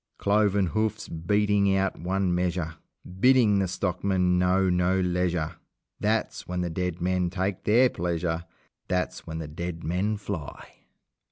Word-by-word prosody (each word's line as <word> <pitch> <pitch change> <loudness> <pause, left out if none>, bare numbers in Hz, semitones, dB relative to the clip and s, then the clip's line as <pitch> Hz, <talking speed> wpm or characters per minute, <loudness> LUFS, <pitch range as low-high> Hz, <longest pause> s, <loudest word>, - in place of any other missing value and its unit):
Cloven 100 -1 +2
hoofs 110 +3 -1
beating 100 +3 +2
out 95 0 0
one 95 +1 0
measure, 90 -2 -1 0.5
Bidding 120 -4 +5
the 95 - +1
stockman 90 0 0
know 95 +1 +3
no 90 +1 +2
leisure 90 -3 0 0.4
That's 110 +1 -1
when 90 0 -2
the 90 -1 -2
dead 90 0 -2
men 90 0 +1
take 95 +1 -3
their 120 +5 +5
pleasure! 85 -4 -2 0.4
That's 90 0 -2
when 80 - -5
the 80 -2 -5
dead 85 +2 -5
men 95 +6 0
fly! 95 -7 -6
90 Hz, 140 wpm, -26 LUFS, 90-100 Hz, 0.5 s, Bidding